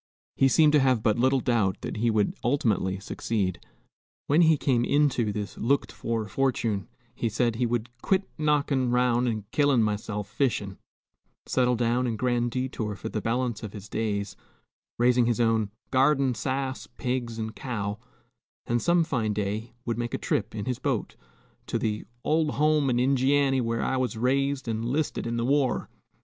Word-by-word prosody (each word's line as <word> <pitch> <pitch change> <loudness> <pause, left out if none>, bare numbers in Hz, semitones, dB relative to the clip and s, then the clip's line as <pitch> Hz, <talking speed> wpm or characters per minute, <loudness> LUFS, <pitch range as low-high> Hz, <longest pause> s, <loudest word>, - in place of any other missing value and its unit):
He 135 - +4
seemed 150 +3 +5
to 150 - +6
have 130 -4 +2
but 110 +1 +2
little 130 +1 +3
doubt 110 -7 +1
that - - -5
he 115 +2 +1
would 105 -2 +1
ultimately 105 -7 +1
succeed. 100 -2 -2 0.6
When 150 +4 +4
he 160 -2 +5
came 125 -4 +1
into 130 -5 +2
this 100 -1 -5
looked 140 +5 +1
for 115 -2 -3
fortune, 115 -4 0 0.3
he 120 -1 -2
said, 115 +2 +1
he 120 0 +1
would 120 -1 -1
"quit 195 0 +1
knockin' 145 -4 +1
'round 125 0 +2
an' 110 -3 -2
killin' 145 -5 +3
myself 105 -1 -2
fishin'," 105 -6 -1 0.7
settle 125 -1 +2
down 120 +2 +1
in 115 - -1
Grand 120 +1 0
Detour 120 -4 -3
for 110 - -6
the 110 - -3
balance 120 0 -1
of 110 -3 -7
his 105 -1 -9
days, 105 -2 -2 0.6
raising 120 0 +4
his 120 -1 0
own 115 -3 +2 0.2
"garden 135 0 +3
sass, 130 +2 -3
pigs, 125 -3 -3
and 110 0 -4
cow;" 105 -5 -4 0.7
and 120 0 0
some 175 0 +3
fine 115 -8 -1
day 105 +3 -3
would 115 -1 -2
make 120 0 -2
a - - -1
trip 110 +1 -2
in 105 - -4
his 125 -2 -2
boat - - -2 0.5
to - - -1
the 105 -1 -2 0.2
"old 155 -1 +1
home 150 -1 +3
in 120 - +1
Injianny, 135 +1 +3
whar 115 -1 -1
I 130 - 0
was 125 -2 -1
raised 135 +2 0
an' 110 -1 -1
'listed 130 +1 -1
in 115 0 -2
the 115 - 0
war." 140 0 +1
120 Hz, 175 wpm, -27 LUFS, 110-135 Hz, 0.7 s, to